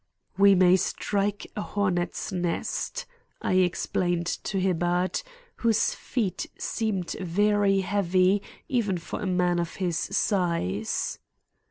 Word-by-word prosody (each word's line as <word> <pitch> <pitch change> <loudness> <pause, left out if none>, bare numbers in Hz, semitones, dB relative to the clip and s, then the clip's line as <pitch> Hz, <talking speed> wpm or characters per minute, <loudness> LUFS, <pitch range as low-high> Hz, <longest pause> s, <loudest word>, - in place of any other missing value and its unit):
"We 200 0 +6
may 180 0 +6
strike 200 +2 -1
a 210 - -2
hornets' 190 -2 -1
nest," 180 - -2 0.3
I - - -1
explained 175 -1 +1
to 195 +2 -2
Hibbard, 180 - +1 0.4
whose 225 -2 +2
feet 220 -7 -2
seemed 200 -6 -2
very 200 +2 +2
heavy 190 0 +2 0.3
even 220 -8 0
for 170 - -6
a 205 - -2
man 180 -1 +2
of 170 -1 -3
his 175 -4 -1
size. 170 - 0
185 Hz, 115 wpm, -27 LUFS, 175-205 Hz, 0.4 s, We